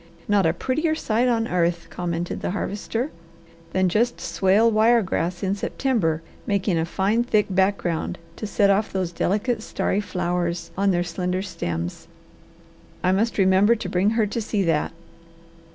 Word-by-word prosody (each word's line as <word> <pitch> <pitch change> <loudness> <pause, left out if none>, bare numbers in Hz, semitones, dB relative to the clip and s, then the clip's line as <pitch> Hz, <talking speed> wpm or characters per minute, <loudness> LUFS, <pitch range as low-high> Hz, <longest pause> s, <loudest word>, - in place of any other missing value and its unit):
"Not 200 -4 +3
a 160 - +2
prettier 310 - 0
sight 235 -3 +1
on 230 -2 +1
earth," 170 -1 0
commented 175 -1 -3
the - - -2
Harvester, 210 +7 -3 0.6
"than 185 +1 +2
just 230 +7 +1
swale 205 +5 +3
wire 225 +2 +4
grass 175 -1 -2
in 190 0 +1
September 200 -7 -1 0.2
making 195 -3 +1
a 160 - 0
fine, 200 +7 +1
thick 215 -4 +2
background 190 -3 0 0.2
to 215 - -4
set 200 -1 +3
off 205 +2 +1
those 185 -3 -2
delicate 210 +6 0
starry 205 -2 -1
flowers 175 -2 -2
on 200 +1 +2
their 175 -2 +2
slender 180 +2 -2
stems. 85 - -4 1.0
I 185 - +3
must 215 +5 +1
remember 195 +3 +5
to 225 - -5
bring 185 +3 +2
her 220 - +4
to 220 +3 -3
see 210 -2 -1
that." 165 -4 +1
195 Hz, 155 wpm, -23 LUFS, 175-215 Hz, 1.0 s, remember